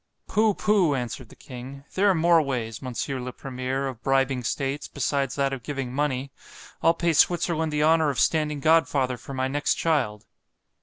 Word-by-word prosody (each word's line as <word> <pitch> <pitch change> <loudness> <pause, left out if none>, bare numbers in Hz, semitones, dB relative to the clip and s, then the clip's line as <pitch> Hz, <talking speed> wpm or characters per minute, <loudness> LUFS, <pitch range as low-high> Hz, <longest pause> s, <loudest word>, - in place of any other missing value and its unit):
_—Poo! 215 -1 +2
poo! 195 -8 +2
answered 120 -1 -5
the - - -15
king—there 140 +9 -3
are 190 - +3
more 170 0 +4
ways, 120 -6 -3
Mons. 130 -2 -4
le 125 -2 -4
Premier, 130 +1 -3
of 125 -3 -7
bribing 135 -1 +1
states, 135 +4 -2
besides 135 -2 -1
that 140 -1 0
of 135 - -5
giving 135 -1 -4
money—I'll 140 +3 -2
pay 170 0 +1
Switzerland 160 0 +2
the 150 0 +1
honour 160 -1 +4
of 135 - -2
standing 150 -2 +1
godfather 145 -5 +3
for 135 +3 -9
my 130 0 0
next 145 +2 0
child. 130 -11 0
140 Hz, 165 wpm, -25 LUFS, 130-160 Hz, -, more